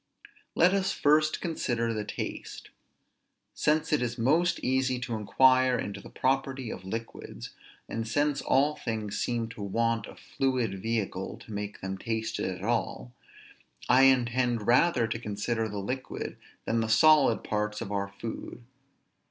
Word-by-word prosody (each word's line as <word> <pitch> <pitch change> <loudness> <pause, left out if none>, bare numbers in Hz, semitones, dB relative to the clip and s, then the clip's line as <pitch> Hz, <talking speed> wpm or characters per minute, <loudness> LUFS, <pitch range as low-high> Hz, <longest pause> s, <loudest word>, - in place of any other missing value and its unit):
Let 180 +3 +5
us 195 -1 +1
first 155 +1 +2
consider 120 -9 -1
the 105 -1 -2
taste. - - -6 0.8
Since 155 +1 +1
it 150 - +3
is 120 0 -2
most 155 +9 +2
easy 130 0 +1
to 120 -1 -4
inquire 130 +4 +4
into 100 -1 -5
the - - -12
property 135 -2 -1
of - - -7
liquids, 115 +4 -7 0.4
and 115 0 -4
since 145 +4 +1
all 145 +3 +2
things 110 -3 -4
seem 120 -2 -1
to 115 -2 -9
want 115 +2 0
a - - -11
fluid 125 -8 -2
vehicle 105 -4 -2
to 110 - -9
make 105 0 -5
them 95 0 -4
tasted 110 -3 -2
at 95 0 -6
all, 100 - -2 0.7
I 130 +2 +6
intend 120 -3 +2
rather 125 +1 +4
to 115 +1 -3
consider 110 +1 -2
the 105 - -5
liquid 125 +7 -4 0.3
than 115 - +1
the 110 -1 -1
solid 145 -1 +5
parts 105 0 -2
of 100 - -5
our 100 -1 -1
food. 115 +3 -7
115 Hz, 150 wpm, -28 LUFS, 105-130 Hz, 0.8 s, I